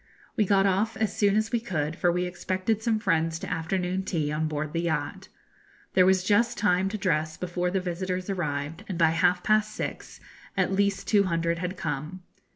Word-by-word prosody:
We 215 - +2
got 195 0 +3
off 200 +3 +1
as 220 -2 -1
soon 205 -2 +3
as 215 +1 +1
we 235 - +1
could, 160 -9 -2
for 175 - +2
we 180 +1 0
expected 185 +4 -2
some 225 -1 +1
friends 165 -5 +1
to - - -6
afternoon 180 +2 -1
tea 160 -6 -2
on 155 +1 0
board 150 0 -3
the 165 - 0
yacht. 170 -2 -2 0.7
There 185 -1 +5
was 190 -1 +3
just 215 +5 +2
time 190 -2 +2
to 215 - -3
dress 160 -5 0
before 180 0 -2
the 190 - -1
first 185 - -3
visitors 180 +1 -3
arrived, 155 -5 -3
and 185 - -3
by 165 -1 +4
half 180 +2 +2
past 215 0 +2
six - - -5 0.4
at - - +2
least 200 0 0
two 205 -2 +4
hundred 170 -1 0
had 180 +1 -4
come. 160 +2 -4
180 Hz, 200 wpm, -27 LUFS, 165-200 Hz, 0.7 s, There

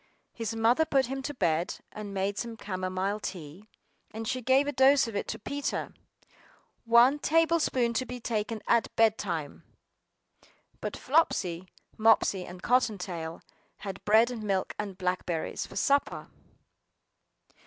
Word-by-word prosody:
His 225 -1 -4
mother 230 +7 +3
put 275 -4 +2
him 270 +2 -4
to 290 +2 -4
bed, 170 -5 0
and 210 -1 -7
made 195 0 -2
some 235 -1 -5
camomile 185 +1 -2
tea; 185 +1 -8 0.4
and 220 0 -6
she 255 +2 -2
gave 265 +3 +3
a 290 - -1
dose 270 -1 +5
of 225 - -7
it 200 - -2
to 225 - -4
Peter! 280 +6 -3 0.9
"One 240 +5 +5
table 330 +2 +3
spoonful 240 -6 +1
to 260 - -3
be 250 0 -6
taken 220 -1 -3
at 235 -1 +3
bed 225 -1 +4
time." 165 -7 -4 1.2
BUT - - -4
Flopsy, 185 - +1 0.3
Mopsy, 215 -4 +3
and 180 +1 -10
Cotton 245 -4 +2
tail 170 -3 -6 0.4
had 195 -1 -6
bread 225 +4 +4
and 235 -3 -5
milk 195 -3 -1
and 200 -3 -4
blackberries, 180 -3 -2
for - - -13
supper. 280 +8 0
220 Hz, 145 wpm, -29 LUFS, 190-250 Hz, 1.2 s, dose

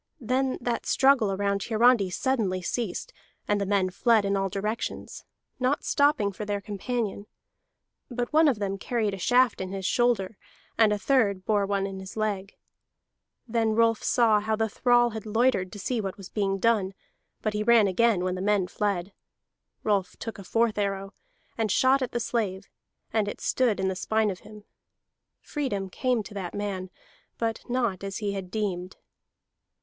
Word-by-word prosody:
Then 255 +2 0
that 240 -1 -2
struggle 265 -6 +4
around 200 0 0
Hiarandi 225 -2 +3
suddenly 210 -4 0
ceased, 220 0 -3 0.3
and 205 -1 +1
the 200 - -1
men 190 -2 +1
fled 220 +2 +3
in 200 0 +1
all 195 0 0
directions, 210 +4 -4 0.3
not 255 +3 +1
stopping 285 -8 +2
for 200 - -7
their 205 -1 -2
companion; 210 0 -3 0.8
but 245 +2 -3
one 315 +1 +6
of 265 -6 +2
them 195 -1 -3
carried 220 -3 -1
a 195 - -5
shaft 245 +3 +3
in 185 - -4
his 195 -1 -4
shoulder, 225 -5 +1 0.4
and 220 -2 +4
a 210 - +1
third 205 -5 +1
bore 205 -2 +2
one 200 -1 0
in 195 -1 -5
his 190 +3 -9
leg. 205 -2 -2 0.9
And 235 - -14
then 225 -2 +2
Rolf 230 -1 +3
saw 225 -3 +3
how 220 +1 -1
the 220 +1 0
thrall 240 +2 +3
had 220 -1 -7
loitered 215 -4 +2
to - - -7
see 225 +4 -2
what 195 -2 -5
was 195 -2 -10
being 195 -2 0
done, 200 -3 +1 0.5
but 215 - 0
he 210 - -1
ran 230 0 +5
again 200 0 +2
when 185 0 0
the 185 - -4
men 205 -1 +2
fled. 195 0 -2 0.7
Rolf 200 -4 0
took 225 -2 -6
a - - -8
fourth 225 +2 +1
arrow, 195 0 -2 0.5
and 220 -3 +1
shot 265 +5 +4
at 255 - -2
the 240 - -1
slave, 205 -5 -2 0.5
and 215 -2 +1
it 205 - -5
stood 240 -6 +1
in 190 - +1
the 190 - -1
spine 220 +2 +1
of 185 - -7
him. 210 -1 -13 0.8
Freedom 205 - -3
came 250 -1 0
to 210 - -11
the 190 -3 -4
man, 195 -2 -3 0.5
but 225 -1 -2
not 235 -7 0
as 195 -1 -4
he 205 -2 -2
had 190 -2 -5
deemed. 190 -3 -3
210 Hz, 180 wpm, -27 LUFS, 195-235 Hz, 0.9 s, one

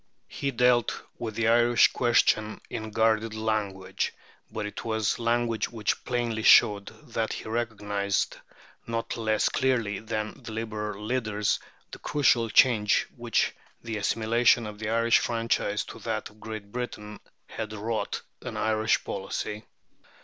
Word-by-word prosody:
He 140 - -2
dealt 125 -2 +2 0.2
with 110 -2 -4
the 115 0 +1
Irish 120 0 +5
question 110 -3 +2
in 110 0 -4
guarded 110 0 +1
language; 105 -4 -2 0.4
but 110 - -3
it 105 - -6
was 110 -1 0
language 115 -1 0
which 110 -3 -2
plainly 120 -3 -1
showed 100 -2 +6 0.3
that 110 -1 -1
he - - -7
recognized, 105 -3 -1 0.5
not 115 0 -2
less 110 -2 +1
clearly 120 -6 0
than 110 +3 -4
the 115 -3 -8
Liberal 105 -2 -4
leaders, 110 -4 0 0.3
the - - -9
crucial 125 -6 +2
change 105 -3 +4
which - - 0 0.3
the 115 -2 -3
assimilation 115 +3 +3
of 105 -1 -8
the 110 -1 -3
Irish 115 +1 +4
franchise 115 -3 0
to - - -10
that 110 0 -3
of 105 - -22
Great 105 -1 -7
Britain 105 -3 -5 0.3
had 110 -1 -6
wrought 110 +1 -3 0.2
in - - -6
Irish 110 0 +1
policy. 105 +2 -4
110 Hz, 135 wpm, -27 LUFS, 105-115 Hz, 0.5 s, showed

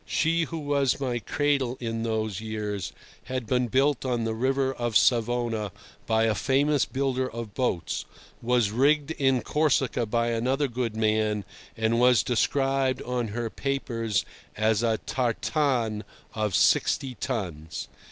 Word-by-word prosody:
She 165 +1 +1
who 165 - -6
was 145 -4 +1
my 125 -3 -1
cradle 135 -1 0
in 115 -2 -3
those 110 -3 -2
years 105 -3 -4 0.3
had 130 -2 -3
been 125 +2 +1
built 135 +3 +2
on 125 -3 0
the 115 0 -1
River 135 +3 +1
of 120 -3 +1
Savona 115 -3 +1 0.4
by 110 0 +3
a 110 -1 +3
famous 140 +5 +2
builder 130 -1 -1
of 115 -2 -7
boats, 125 -10 -1 0.4
was 120 -3 +2
rigged 145 +5 +2
in 135 -5 +1
Corsica 135 -6 +1
by 115 +2 +1
another 130 +5 +1
good 120 -3 -3
man, 110 -2 +1 0.3
and 115 +1 +1
was 125 -2 +5
described 135 +1 +1
on 125 -2 -2
her 115 +1 -3
papers 115 -6 -1 0.3
as 110 0 +2
a 115 -2 +2
'tartane' 120 -2 0 0.3
of 105 -3 -1
sixty 135 -2 +3
tons. 80 - -4
120 Hz, 140 wpm, -27 LUFS, 110-135 Hz, 0.4 s, was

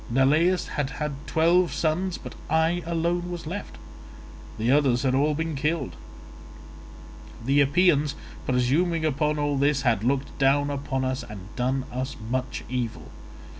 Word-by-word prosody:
Neleus 155 +9 +3
had 145 -2 -2
had 150 -1 -2
twelve 170 +2 +3
sons, 175 +3 0
but - - -9 0.2
I 160 +3 +2
alone 170 +1 0
was 175 -2 -6
left; 190 +6 -6 0.8
the 115 +3 +1
others 135 -4 +3
had 130 -2 +2
all 145 +3 +2
been 165 +1 -2
killed. 150 - -1 1.5
The 140 +3 +4
Epeans 150 -1 +3 0.3
presuming 155 +7 +1
upon 150 +1 +1
all 145 -1 0
this 140 -1 +2
had 115 -5 +2
looked 135 +3 0
down 145 +1 +3
upon 135 -2 -2
us 130 +1 -1
and - - -11
had 95 +3 -14
done 130 +1 0
us 130 +2 -3 0.2
much 130 0 -2
evil. 115 - -4
145 Hz, 145 wpm, -26 LUFS, 130-165 Hz, 1.5 s, The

